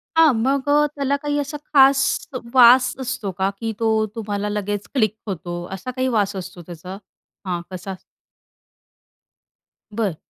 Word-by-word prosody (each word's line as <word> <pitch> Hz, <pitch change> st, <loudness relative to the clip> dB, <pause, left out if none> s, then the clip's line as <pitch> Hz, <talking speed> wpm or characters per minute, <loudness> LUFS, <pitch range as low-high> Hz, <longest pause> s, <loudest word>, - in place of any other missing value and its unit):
हां, 320 Hz, -4 st, +6 dB
मग 265 Hz, +5 st, 0 dB
अ, 295 Hz, +1 st, +5 dB
त्याला 280 Hz, 0 st, 0 dB
काही 290 Hz, 0 st, -1 dB
असा 290 Hz, +1 st, -4 dB, 0.2 s
खास 270 Hz, -1 st, +6 dB, 0.5 s
वास 250 Hz, 0 st, +7 dB
असतो 255 Hz, -6 st, -3 dB
का, 190 Hz, +1 st, +1 dB
की 225 Hz, -1 st, -2 dB
तो 220 Hz, -1 st, +2 dB
तुम्हाला 205 Hz, -2 st, -3 dB
लगेच 205 Hz, 0 st, -3 dB
क्लिक 215 Hz, -5 st, +1 dB
होतो. 175 Hz, -2 st, -5 dB
असा 195 Hz, +7 st, -5 dB
काही 260 Hz, +1 st, -1 dB
वास 200 Hz, -1 st, 0 dB
असतो 180 Hz, -1 st, -7 dB
त्याचा? 180 Hz, +3 st, -8 dB, 0.5 s
हां. 175 Hz, -2 st, -2 dB
कसा? 185 Hz, +1 st, -6 dB, 2.0 s
बरं. 205 Hz, -7 st, -1 dB
220 Hz, 140 wpm, -21 LUFS, 195-265 Hz, 2.0 s, वास